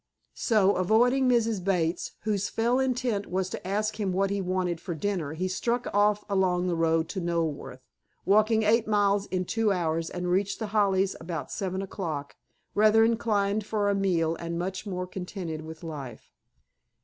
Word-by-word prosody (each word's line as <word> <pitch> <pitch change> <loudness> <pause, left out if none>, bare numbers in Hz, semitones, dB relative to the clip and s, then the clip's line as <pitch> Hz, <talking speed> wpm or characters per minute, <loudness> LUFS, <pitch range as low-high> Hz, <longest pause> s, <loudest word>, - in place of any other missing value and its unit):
So, 205 -4 +3
avoiding 245 +8 +3
Mrs. 230 -5 +1
Bates, 175 -3 0
whose 210 -2 -1
fell 235 +3 +1
intent 250 -5 0
it - - -15
was 185 0 -1
to - - -6
ask 215 +2 -1
him 200 -3 0
what 195 +2 +1
he 200 0 -1
wanted 180 -2 -1
for 175 -2 -4
dinner, 165 -4 -2
he 180 +4 -2
struck 235 +6 -1
off 205 +1 +3
along 185 -3 +1
the 180 -2 0
road 165 0 +2
to 190 - -3
Knoleworth, 165 -6 -2 0.4
walked 215 +3 +4
eight 220 0 +3
miles 205 -1 +2
in 185 -1 -2
two 225 +2 +1
hours, 165 -3 -1
and 180 0 -3
reached 195 +2 +1
The 220 -3 -5
Hollies 195 -2 +2
about 165 -2 -5
seven 190 0 -3
o'clock, 160 -7 -5 0.4
rather 215 +1 +5
inclined 215 -2 +1
for 210 -1 0
a - - +2
meal 175 -5 +1
and 170 0 -4
much 190 +4 -4
more 180 -2 -3
contented 180 -3 -6
with 160 +1 -10
life. 140 -8 -8
195 Hz, 175 wpm, -27 LUFS, 175-210 Hz, 0.4 s, rather